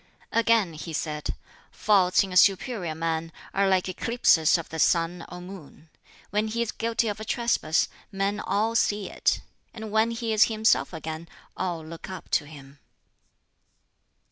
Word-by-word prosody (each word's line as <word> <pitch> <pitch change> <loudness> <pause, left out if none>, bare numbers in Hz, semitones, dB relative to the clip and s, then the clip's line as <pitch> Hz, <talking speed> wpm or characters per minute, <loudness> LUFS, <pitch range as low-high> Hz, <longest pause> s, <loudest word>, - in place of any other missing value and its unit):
Again 230 -6 +3
he 155 +1 -7
said, 150 -1 -3 0.3
"Faults 190 -4 +3
in 190 -2 -6
a - - -5
superior 190 -2 +3
man 165 0 -2 0.2
are 195 0 +2
like 190 -1 +2
eclipses 185 -4 +3
of 165 - -6
the 160 - -6
sun 170 +1 +2
or 180 - -8
moon: 175 -4 -12 0.4
when 210 +2 +1
he 230 +2 -1
is 230 - -4
guilty 230 0 -1
of 205 -1 -3
a - - -5
trespass 220 -8 +1 0.2
men 200 +1 -1
all 215 +3 0
see 210 -3 0
it; - - +1 0.3
and 220 -2 -7
when 220 +2 +3
he 230 -1 -2
is 215 - +6
himself 220 0 +2
again, 160 0 -6 0.3
all 175 -4 -3
look 165 +3 -9
up 185 -4 -9
to 150 - +2
him." 140 -2 -13
190 Hz, 160 wpm, -26 LUFS, 165-220 Hz, 0.4 s, is